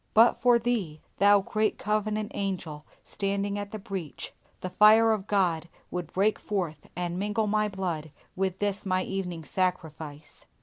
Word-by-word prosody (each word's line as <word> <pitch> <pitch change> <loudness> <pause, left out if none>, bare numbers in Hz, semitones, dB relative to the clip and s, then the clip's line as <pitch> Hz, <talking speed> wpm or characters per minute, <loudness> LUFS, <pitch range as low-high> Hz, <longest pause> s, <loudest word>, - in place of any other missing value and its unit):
But 230 +2 +6
for 245 -1 +6
Thee, 220 -10 -1 0.2
Thou 200 +1 +6
great 215 +2 0
Covenant 215 0 -1
Angel 175 -6 -4 0.2
standing 200 0 -2
in 205 0 -4
the 215 - -5
breach, 190 -6 -6 0.3
the 185 - -4
fire 215 +3 +7
of 210 -2 -1
God 175 -5 +1 0.2
would 180 -3 -4
break 205 +3 +2
forth 170 -8 -3
and 175 0 -2
mingle 210 +2 0
my 210 0 +2
blood 180 -6 -3 0.3
with 190 -1 -1
this 205 0 -1
my 185 -2 +1
evening 180 -4 -4
sacrifice! 160 -4 -3
195 Hz, 150 wpm, -28 LUFS, 175-210 Hz, 0.3 s, fire